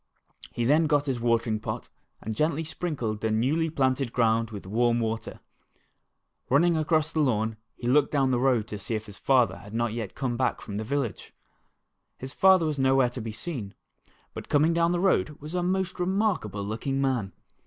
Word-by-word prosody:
He 120 - -2
then 155 +5 +4
got 145 -1 +2
his 130 -4 -2
watering 115 -2 +1
pot - - -5 0.4
and 110 0 -4
gently 155 +4 0
sprinkled 145 -10 -3
the 110 - 0
newly 135 +10 +1
planted 130 -4 0
ground 115 -1 +2
with 105 -4 -8
warm 120 +4 +1
water. 115 -1 -3 1.1
Running 165 +6 +4
across 155 0 +1
the 160 - 0
lawn 110 -6 +1 0.2
he - - -9
looked 140 +3 +4
down 135 -3 +2
the 125 - +1
road 125 -4 +2
to 105 - -5
see 110 +3 -3
if 110 0 -4
his 105 -2 -10
father 130 -3 +3
had 105 +2 -10
not 120 -1 0
yet 115 -4 -5
come 125 -3 -2 0.2
from 100 -2 -6
the 110 - -2
village. 135 -1 -3 0.8
His 130 +1 -7
father 190 -3 +5
was 150 -3 -2
nowhere 130 -2 +3
to 125 - -6
be 110 0 -5
seen, 115 - -6 0.6
but - - -8
coming 155 +3 +3
down 170 0 +2
the 175 - 0
road 175 -5 +1
was 150 +3 -9
a 180 - 0
most 185 +1 -1
remarkable 180 - 0
looking 135 +6 -2
man. 125 -8 0
130 Hz, 185 wpm, -27 LUFS, 115-155 Hz, 1.1 s, father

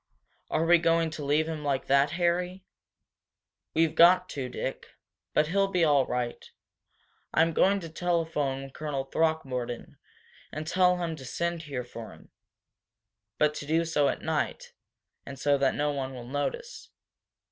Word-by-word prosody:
"Are 165 - +1
we 170 0 +6
going 165 -1 +2
to 155 -1 -6
leave 150 +3 +2
him 155 -2 -4
like 140 -2 -1
that, 140 +1 +4
Harry?" 180 +1 0 1.1
"We've 160 -1 +3
got 180 +2 +6
to, 130 -3 -4
Dick. 130 +1 -5 0.4
But 150 +1 +3
he'll 195 +2 +2
be 180 -3 +1
all 145 -4 +4
right, 125 -1 -3 0.9
I 160 - +6
am 165 0 0
going 200 +5 +3
to 165 - -7
telephone 160 -5 -1
to 135 - -10
Colonel 145 -3 -3
Throckmorton 135 -5 -2 0.5
and 155 +1 -5
tell 180 +2 +3
him 170 -2 -3
to 135 - -10
send 170 +6 -2
here 140 -6 -5
for 115 -2 -9
him, - - -18 1.1
but 150 0 +3
to 145 - -7
do 165 +2 +2
so 150 -3 +2
at - - -4
night, - - -2 0.5
and 140 -1 -9
so 140 +1 +2
that 135 -1 +2
no 150 0 0
one 135 -2 -4
will 120 -1 -8
notice. 145 - -4
155 Hz, 160 wpm, -28 LUFS, 140-170 Hz, 1.1 s, we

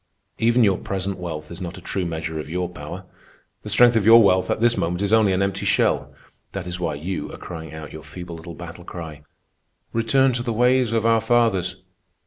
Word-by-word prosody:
"Even 120 +1 +4
your 100 -3 +3
present 95 0 -3
wealth 80 -3 -6
is 85 - -8
not 90 0 -6
a - - -8
true 95 +1 -3
measure 80 -1 -4
of 75 - -6
your 90 +2 -2
power. 90 +2 -8 0.6
The 105 - -7
strength 120 +3 +5
of 110 - +3
your 115 +2 +8
wealth 95 -2 +3
at - - 0
this 120 +1 +3
moment 90 +3 -1
is 100 +2 0
only 110 -3 +5
an 95 +1 +1
empty 100 0 -2
shell. - - +1 0.4
That 95 -2 -4
is 90 0 -4
why 85 -4 -2
you 85 +6 -4
are - - -8
crying 80 -3 -8
out 80 -1 -9
your 80 - -8
feeble 85 +4 -9
little 80 +1 -9
battle 85 +1 -9
cry, 80 -4 -8 0.7
'Return 130 +4 +3
to 120 - -1
the 120 -1 -2
ways 125 +1 +3
of 115 -1 0
our 115 -1 +4
fathers. 95 -6 +1
95 Hz, 215 wpm, -23 LUFS, 85-115 Hz, 0.7 s, your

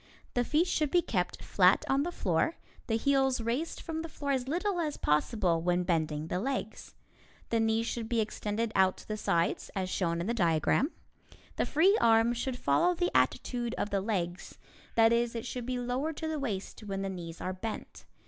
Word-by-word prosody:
The 245 - +2
feet 305 +7 +2
should 310 -4 0
be 350 +3 +3
kept 180 -4 -2
flat 185 -1 +4
on 270 +1 +2
the 345 +4 -2
floor, 200 - 0 0.3
the 225 - +1
heels 270 +1 +2
raised 240 +8 -2
from 320 -1 -4
the 330 - -6
floor 285 -2 -3
as 260 -2 0
little 360 +5 0
as 300 -3 -2
possible 165 +2 +1
when 180 +1 +1
bending 155 -3 0
the 180 +3 -2
legs. 265 +6 -4 0.6
The 230 - +2
knees 225 0 +2
should 230 -1 -3
be 235 -2 +1
extended 215 +1 -2
to 190 -1 +2
the 215 - -2
sides, 170 -5 0
as 185 -1 -2
shown 170 -3 0
in 170 - -2
the 230 - 0
diagram. 170 - +2 0.7
The - - +1
free 365 +7 +4
arm 230 +1 +5
should 245 +1 -3
follow 250 - +2
the 350 +1 -1
attitude 240 -2 +1
of 205 - -2
the 200 -1 +1
legs 180 -4 -3 0.4
that 225 0 +6
is, 235 0 +1
it 230 +1 -4
should 245 -1 -5
be 255 -1 -1
lowered 255 +6 -2
to 320 - -3
the 315 -1 -2
waist 215 -8 -4
when 195 -2 -4
the - - -2
knees 170 -3 -6
are 185 - -3
bent. 220 +4 -6
230 Hz, 195 wpm, -30 LUFS, 185-270 Hz, 0.7 s, that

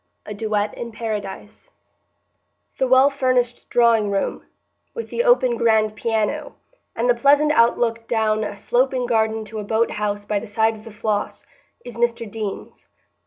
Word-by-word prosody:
A 210 - -6
Duet 210 0 -1
in 235 -1 -7
Paradise 210 -3 -6 1.1
The 265 - +2
well 260 +2 +5
furnished 255 -3 0
drawing 230 -3 +3
room, 200 -1 -2 0.5
with 465 - -6
the 475 - 0
open 260 - +3
grand 220 -2 +2
piano, 220 -1 -2 0.4
and - - 0
the - - +5
pleasant 290 -3 +4
outlook 230 -2 +2
down 220 -2 +1
a 205 - -5
sloping 250 +4 0
garden 220 -2 0
to 215 +1 -7
a - - -4
boat 220 +3 0
house 205 -1 -3
by 210 0 -1
the 230 - -9
side 220 +2 +1
of 215 +1 -14
the 225 - -10
Floss, 210 -1 -3 0.4
is 240 -2 -9
Mr 235 0 0
Deane's. 210 -1 -7
225 Hz, 160 wpm, -21 LUFS, 215-245 Hz, 1.1 s, well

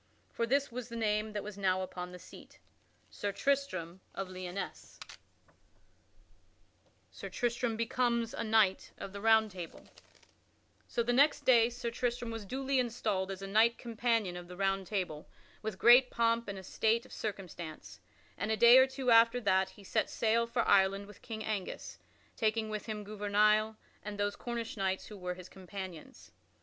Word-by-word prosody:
For 230 - -1
this 275 +2 +1
was 245 0 -6
the 235 - -7
name 215 -1 0
that 205 - -3
now 190 -2 +2
was 185 - -2
upon 180 -1 -7
that 180 - -9
seat: - - -14 0.5
SIR 205 -1 -3
TRISTRAM 235 -11 -1
OF 195 -1 -4
LYONESSE 185 0 -6
[Sidenote: - - -12 1.9
Sir - - -8
Tristram 240 -1 -1
becomes 235 0 0
knight 215 -4 +2
of 195 - -7
the 200 - -7
Round 220 -1 +4
Table] 180 -3 -9 1.0
So 235 - 0
the 245 +1 0
next 285 +4 +4
day 235 -2 +5
Sir 240 -1 -4
Tristram 240 0 -2
was 225 -2 -6
duly 265 +4 -1
installed 215 -6 -1
as 195 0 -6
a - - -4
knight 220 +4 +4
companion 230 -5 -1
of 175 0 -8
the 180 0 -10
Round 195 -1 0
Table 180 -7 -3 0.3
with 220 -2 -4
a - - -23
great 245 +4 +7
pomp 230 0 +1
and 200 -1 -5
estate 220 +4 0
of - - -14
circumstance, 180 -6 -6 0.4
and 200 - -2
a 220 - +1
day 235 +3 +9
or 260 - +6
two 265 -2 -1
after 230 +1 +6
that 190 -3 +2
he 205 - -16
set - - 0
sail 230 +1 +1
for 235 0 -1
Ireland 195 0 +4
with 210 -1 -15
King 220 -2 -6
Angus, 210 -4 -4 0.4
taking 220 -1 0
with 215 +1 -5
him 215 -1 -4
Gouvernail 210 +1 +2 0.2
and 205 0 -6
those 205 0 0
Cornish 235 -1 -5
knights 190 -1 -1
who 210 - -10
were 180 0 -4
his 180 0 -11
companions. 190 -4 -9
215 Hz, 170 wpm, -32 LUFS, 195-235 Hz, 1.9 s, day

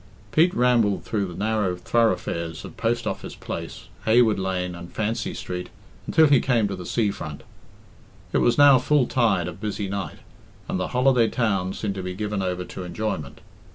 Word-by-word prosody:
Pete 170 +3 +4
rambled 120 -5 +3
through 100 -3 -1
the 90 - -8
narrow 105 -3 0
thoroughfares 90 -5 0
of - - -10
Post 115 0 -1
Office - - -4
Place, - - -7 0.2
Heywood 110 -2 +4
Lane, 90 -1 -2
and 85 0 -9
Fancy 110 +1 -2
Street, 90 0 -5 0.4
until 160 - +5
he 140 -3 +5
came 120 -5 +2
to 100 - -3
the 90 -2 -8
sea 110 -4 +1
front. 75 -6 -7 0.9
It - - +3
was 120 - +3
now 145 -2 +8
full 140 +1 +3
tide 105 -9 +1
of 90 +2 -8
busy 105 -1 -3
night, 95 -5 -4 0.5
and - - -2
the 90 - -1
holiday 125 -2 +3
town 95 -6 0
seemed 100 -1 -3
to 95 - -5
be 90 0 -5
given 105 0 -2
over 90 -1 -2
to 95 - -7
enjoyment. 85 -7 -4
105 Hz, 180 wpm, -24 LUFS, 90-115 Hz, 0.9 s, now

